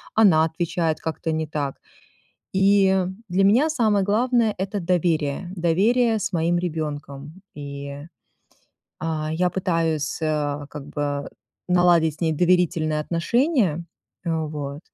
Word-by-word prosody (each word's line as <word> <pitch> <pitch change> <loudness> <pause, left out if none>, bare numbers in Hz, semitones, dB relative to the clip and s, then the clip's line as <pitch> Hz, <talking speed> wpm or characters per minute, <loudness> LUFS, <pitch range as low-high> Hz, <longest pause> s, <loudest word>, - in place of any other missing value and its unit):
она 175 -8 +5
отвечает 160 0 -1
как-то 160 0 -3
не 160 0 -2
так. 145 -3 -3 0.8
И 190 -1 +3 0.2
для 190 +2 +2
меня 250 +11 +4
самое 215 -9 +2
главное 230 +1 +2
это 195 +2 -2
доверие, 170 -1 0
доверие 220 +8 +2
с 195 +1 -3
моим 170 0 +1
ребёнком, 150 -1 -5
и, 140 0 -7 1.0
а, 155 -1 -2
я 180 +2 +1
пытаюсь, 165 -5 -1
э, 145 -2 -1
как 150 -2 -8
бы 145 -1 -3 0.4
наладить 175 -3 +4
с - - -24
ней 160 -1 +2
доверительные 170 -2 +2
отношения, 175 - +1 0.4
вот, 150 -4 -3
165 Hz, 115 wpm, -23 LUFS, 155-190 Hz, 1.0 s, она